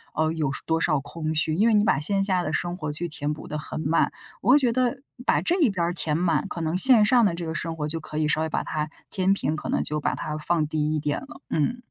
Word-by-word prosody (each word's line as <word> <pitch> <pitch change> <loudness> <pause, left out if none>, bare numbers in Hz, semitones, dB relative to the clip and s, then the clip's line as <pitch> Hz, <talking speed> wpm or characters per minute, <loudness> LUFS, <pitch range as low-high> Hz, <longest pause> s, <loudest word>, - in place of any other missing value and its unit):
呃， 155 0 +1
有 150 -4 -1
多 165 0 0
少 150 -4 +2
空 155 +2 -4
虚， 155 0 +2
因 210 +7 +3
为 230 - +4
你 205 - +4
把 135 - +3
线 195 +6 +1
下 190 -2 +1
的 155 - -2
生 175 +2 -1
活 155 -5 -4
去 165 +4 -3
填 150 -2 -3
补 150 - -10
得 150 - -4
很 150 - -6
满。 160 +3 +2 0.3
我 235 - +3
会 295 - +7
觉 245 -4 +1
得 255 +1 0 0.3
把 - - +3
这 350 - +1
一 280 - +5
边 180 -4 -1
儿 175 - -1
填 155 -3 0
满， 170 -4 +1
可 170 - -5
能 160 +1 -1
线 230 -1 +7
上 240 +2 +4
的 200 -6 +3
这 170 -1 -5
个 160 - -3
生 165 0 -3
活 150 -1 -2
就 165 +2 -3
可 155 0 -7
以 155 -1 +1
稍 155 - +1
微 160 - -1
把 - - -1
它 155 0 -3 0.2
天 190 0 +1
平 155 -6 0
可 - - -6
能 - - +1
就 150 0 -3
把 - - 0
它 155 0 -4
放 160 0 +1
低 155 0 -1
一 - - 0
点 145 +6 -2
了， 275 +2 -12
嗯。 195 +11 0
165 Hz, 305 characters per minute, -25 LUFS, 155-195 Hz, 0.3 s, 会